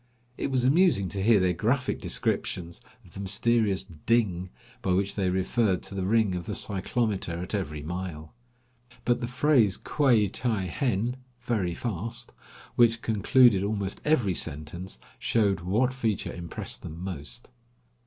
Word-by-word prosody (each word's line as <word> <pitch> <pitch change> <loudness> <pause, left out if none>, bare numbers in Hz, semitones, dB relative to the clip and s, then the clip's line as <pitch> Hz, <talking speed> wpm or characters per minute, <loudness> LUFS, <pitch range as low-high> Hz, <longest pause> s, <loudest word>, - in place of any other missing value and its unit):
It - - -2
was 130 -2 +1
amusing 135 - +4
to 95 +3 -3
hear 110 +1 +5
their 90 -1 +2
graphic 125 +9 0
descriptions 85 -1 -2 0.2
of - - -18
the - - -8
mysterious 100 +1 +2
"ding," 90 +1 0 0.3
by 95 - +1
which 100 +2 +1
they 95 -3 0
referred 95 +1 +1
to - - -4
the 95 -1 -2
ring 110 -2 +3
of 90 -1 -4
the 105 - -2
cyclometer 100 -2 -1
at 90 +4 -5
every 75 -7 -3
mile. 85 -2 -6 0.7
But 120 -1 +2
the 120 - -2
phrase 125 -6 +3
quai 125 -8 +3
ti 110 -1 -1
henn 120 - -1 0.2
(very 105 -8 -1
fast), 115 +3 -4 0.4
which 115 -1 +4
concluded 110 0 +4
almost 100 -1 -2
every 130 -11 +2
sentence, 80 +1 -3 0.2
showed 100 -5 +2
what 110 +9 +1
feature 115 -6 -2
impressed 85 -1 -4
them 80 +1 -8
most. 90 - -6
100 Hz, 145 wpm, -27 LUFS, 90-120 Hz, 0.7 s, hear